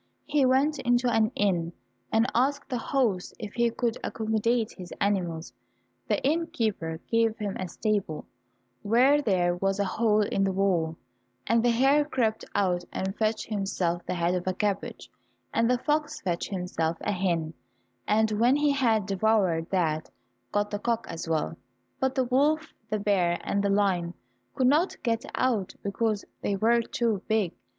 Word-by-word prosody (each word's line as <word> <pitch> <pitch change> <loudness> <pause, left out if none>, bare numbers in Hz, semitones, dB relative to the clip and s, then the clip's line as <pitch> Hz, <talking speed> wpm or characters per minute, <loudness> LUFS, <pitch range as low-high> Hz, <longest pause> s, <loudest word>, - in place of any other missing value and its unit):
He 290 -3 +2
went 275 +3 +2
into 245 -1 +2
an 220 0 +3
inn, 175 -4 0 0.4
and 225 +1 +3
asked 280 +4 +1
the 250 - -1
host 225 -8 0
if 210 -2 -7
he 235 0 +2
could 235 0 -1
accommodate 220 0 0
his 180 -1 -10
animals. 175 -5 -1 0.5
The - - +1
innkeeper 220 - -1
gave 230 -1 +2
him 205 -2 -3
a 185 - -3
stable, 200 -5 -2 0.6
where 255 +7 +4
there 180 -7 +1
was 195 +2 0
a 200 - +2
hole 215 +2 +2
in 200 -1 0
the 195 - +1
wall, 180 -4 0 0.5
and 230 0 +3
the 245 - +4
hare 270 +5 +4
crept 235 -7 -1
out 180 -3 +1
and 190 +1 -3
fetched 215 0 0
himself 195 -4 -1
the - - -1
head 175 0 +1
of 180 0 -2
a 185 - 0
cabbage, 200 0 -3 0.4
and 230 - +2
the 250 - +3
fox 300 +3 -1
fetched 175 -3 -2
himself 180 -4 -2
a - - -1
hen, 170 -4 -1 0.5
and 220 +1 +3
when 235 +5 +3
he 290 0 +3
had 230 -7 +2
devoured 195 -4 +1
that 160 -5 0 0.4
got 205 0 0
the 205 - -2
cock 230 +1 -1
as 165 0 -5
well, 160 -2 0 0.4
but 265 0 0
the 260 - +2
wolf, 295 +5 +1 0.2
the 215 - 0
bear, 190 -4 +1
and 200 - 0
the 200 - +1
lion 190 -4 +1 0.4
could 260 - +1
not 300 +8 +3
get 230 -1 0
out 230 -7 0
because 210 +1 -1 0.2
they 200 - 0
were 230 +4 +3
too 225 -3 -1
big. 215 -6 +1
215 Hz, 165 wpm, -27 LUFS, 185-240 Hz, 0.6 s, where